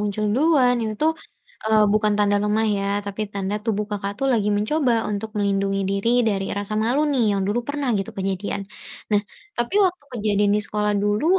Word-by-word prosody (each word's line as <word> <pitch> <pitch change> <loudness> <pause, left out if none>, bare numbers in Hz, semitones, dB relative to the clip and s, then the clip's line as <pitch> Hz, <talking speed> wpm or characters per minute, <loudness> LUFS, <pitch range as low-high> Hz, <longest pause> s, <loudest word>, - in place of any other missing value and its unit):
muncul 210 0 -1
duluan 270 -4 +4
itu 215 -1 -2
tuh, 320 +1 +4 0.5
eee, 220 0 +3
bukan 215 0 +2
tanda 205 0 +3
lemah, 215 +1 +1
ya, 195 - -2 0.2
tapi 200 +1 -5
tanda 200 0 -2
tubuh 210 -2 0
Kakak 200 -1 -3
tuh 270 - 0
lagi 210 -4 +1
mencoba 255 +5 +1 0.2
untuk 210 +1 -3
melindungi 195 -1 0
diri 200 +3 0 0.2
dari 195 -2 -1
rasa 205 +1 -4
malu, 245 +6 +1
nih, 255 - +2
yang 200 -1 0
dulu 215 +4 0
pernah 285 -2 -2
gitu 195 - -4
kejadian. 195 +1 -2 0.5
Nah, 205 - +4 0.4
tapi 240 +10 -2
waktu 360 -4 -1
kejadian 205 -2 +1
di - - +1
sekolah 210 0 0
dulu 205 +6 +1
210 Hz, 185 wpm, -22 LUFS, 200-235 Hz, 0.5 s, duluan